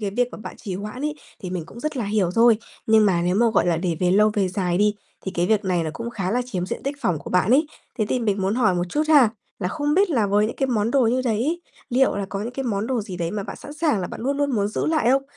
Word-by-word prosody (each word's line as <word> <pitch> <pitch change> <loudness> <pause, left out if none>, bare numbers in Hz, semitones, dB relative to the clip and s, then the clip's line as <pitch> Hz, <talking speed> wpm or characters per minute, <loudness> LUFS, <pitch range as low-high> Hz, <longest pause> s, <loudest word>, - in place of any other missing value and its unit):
cái 205 -2 -2
việc 245 +4 +1
mà - - -8
bạn 215 - -8
trì 195 -5 -5
hoãn 210 +6 -6
ấy, 300 0 -1 0.3
thì 180 - -6
mình 180 -3 -3
cũng 235 +8 -11
rất 305 0 -3
là 240 - -1
hiểu 200 -3 +1
thôi. 230 -1 +5 0.3
Nhưng 220 -1 +5
mà 175 -3 +2
nếu 180 +1 +1
mà, 235 +4 +4
gọi 220 - +2
là, 170 -2 +2
để 170 -1 -1
về 180 -1 +3
lâu 210 +3 +4
về 195 -3 +1
dài 180 -1 -1
đi, 210 0 +3 0.3
thì 190 - -5
cái 175 +1 +1
việc 215 -1 +2
này 180 -2 +1
nó 160 - -2
cũng 235 +5 -5
khá 195 -5 -3
là 245 +2 +1
chiếm 180 -7 -3
diện - - -5
tích 280 +1 -3
phỏng 175 - 0
của - - -9
bạn 180 +3 +2
ấy. 290 +5 +4 0.3
Thế 215 - +1
thì - - +1
mình 205 -4 0
muốn 195 +2 +1
hỏi 225 -6 +3
một 175 0 0
chút 295 +12 0
ha, 285 -7 +7 0.3
là 180 - -1
không 295 +6 -1
biết 390 +1 +3
là 230 -9 +2
với 205 +1 +3
những 225 - -5
cái 270 - +1
món 225 -3 0
đồ 260 -2 +3
như 250 +3 +2
đấy, 250 +9 0 0.3
liệu 260 -1 +3
là 200 -1 -2
có 195 0 -4
những 230 +4 -4
cái 270 +1 -4
món 210 -3 -1
đồ 255 -2 0
gì 200 -3 -7
đấy 170 -1 -2
mà 210 +1 -3
bạn - - -7
sẵn 290 - -10
sàng 300 -6 +1
là 180 - -2
bạn - - -8
luôn 275 +4 -1
luôn 285 0 0
muốn 205 -5 +1
giữ 215 - -2
lại 310 -7 +2
không? 270 +1 +3
215 Hz, 315 wpm, -23 LUFS, 190-255 Hz, 0.3 s, ha